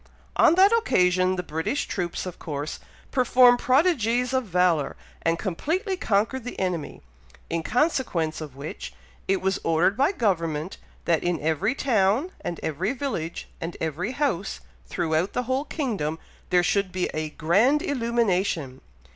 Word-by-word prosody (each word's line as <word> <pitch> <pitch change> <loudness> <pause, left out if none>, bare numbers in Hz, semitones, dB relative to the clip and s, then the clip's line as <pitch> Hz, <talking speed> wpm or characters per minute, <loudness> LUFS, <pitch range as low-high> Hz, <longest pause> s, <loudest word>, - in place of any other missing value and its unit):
On 325 - +5
that 385 +3 +6
occasion 185 - +2
the 180 - -3
British 160 - -2
troops 175 -2 -3
of 185 - -7
course 145 -1 -5 0.3
performed 250 -1 +5
prodigies 250 - +2
of 260 -1 +1
valour, 180 -5 +2 0.3
and 165 0 +1
completely 330 - -2
conquered 225 - 0
the 245 - -7
enemy, 180 - -3 0.5
in 165 0 0
consequence 210 - 0
of 145 -4 -8
which, 140 +3 -7 0.3
it 195 0 +1
was 190 +1 +1
ordered 165 +4 +2
by 275 - +3
government, 170 - -1 0.3
that, 165 -2 +2
in 175 -2 0
every 160 - 0
town, 235 - +2
and 170 - -4
every 175 - -1
village, 235 - -4
and 165 +1 -5
every 165 - -2
house 250 - -1 0.3
throughout 160 - 0
the 250 - 0
whole 260 +4 -1
kingdom, 205 - -2 0.3
there 180 -1 +4
should 195 +1 +1
be 185 0 -1
a 155 0 -2
grand 210 - +2
illumination. 200 - 0
190 Hz, 145 wpm, -25 LUFS, 165-255 Hz, 0.5 s, that